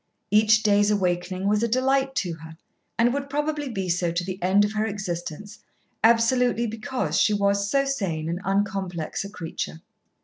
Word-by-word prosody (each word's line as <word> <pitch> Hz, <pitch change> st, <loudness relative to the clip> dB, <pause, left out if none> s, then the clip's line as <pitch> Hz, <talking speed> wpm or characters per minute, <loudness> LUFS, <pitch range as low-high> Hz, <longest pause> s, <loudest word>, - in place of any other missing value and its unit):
Each 215 Hz, +1 st, +5 dB
day's 205 Hz, 0 st, +4 dB
awakening 185 Hz, -1 st, 0 dB
was 210 Hz, +1 st, +2 dB
a 235 Hz, -, +2 dB
delight 265 Hz, +3 st, +1 dB
to 175 Hz, -3 st, -1 dB
her, 160 Hz, 0 st, -11 dB, 0.4 s
and 240 Hz, +1 st, +3 dB
would 280 Hz, 0 st, -3 dB
probably 295 Hz, 0 st, -2 dB
be 195 Hz, -5 st, -3 dB
so 175 Hz, -1 st, 0 dB
to 170 Hz, +1 st, -1 dB
the 185 Hz, +1 st, -6 dB
end 195 Hz, +3 st, +4 dB
of 210 Hz, -, -4 dB
her 215 Hz, +1 st, 0 dB
existence, 195 Hz, 0 st, -5 dB, 0.4 s
absolutely 235 Hz, +1 st, +3 dB
because 225 Hz, -, -2 dB
she 210 Hz, -, +3 dB
was 200 Hz, 0 st, +1 dB
so 275 Hz, +3 st, +2 dB
sane 185 Hz, -13 st, -2 dB
and 170 Hz, +3 st, -3 dB
uncomplex 195 Hz, -4 st, -2 dB
a 200 Hz, -, -7 dB
creature. 165 Hz, -3 st, -6 dB
205 Hz, 170 wpm, -25 LUFS, 180-230 Hz, 0.4 s, Each